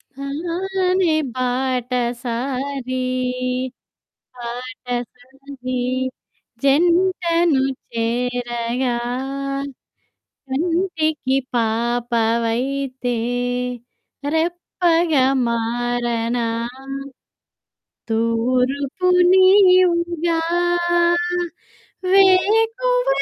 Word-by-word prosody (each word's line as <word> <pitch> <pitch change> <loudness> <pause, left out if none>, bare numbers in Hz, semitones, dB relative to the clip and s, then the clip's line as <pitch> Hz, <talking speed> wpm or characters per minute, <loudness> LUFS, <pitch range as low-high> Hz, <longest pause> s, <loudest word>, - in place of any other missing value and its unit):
హానే 350 +4 0 0.2
బాటసారి, 255 +1 -2 1.3
బాటసారి. 250 +2 -6 0.8
జంటను 340 0 +3 0.3
చేరగా 240 +1 -1 1.5
కంటికి 315 -3 0 0.2
పాపవైతే, 235 +2 0 1.2
రెప్పగా 335 -3 +1 0.2
మారనా. 235 0 -1 1.6
తూర్పు 255 +8 0 0.2
నీవుగా 365 -3 +4 1.7
వేకువ 450 +6 +4
265 Hz, 30 wpm, -20 LUFS, 240-340 Hz, 1.7 s, నీవుగా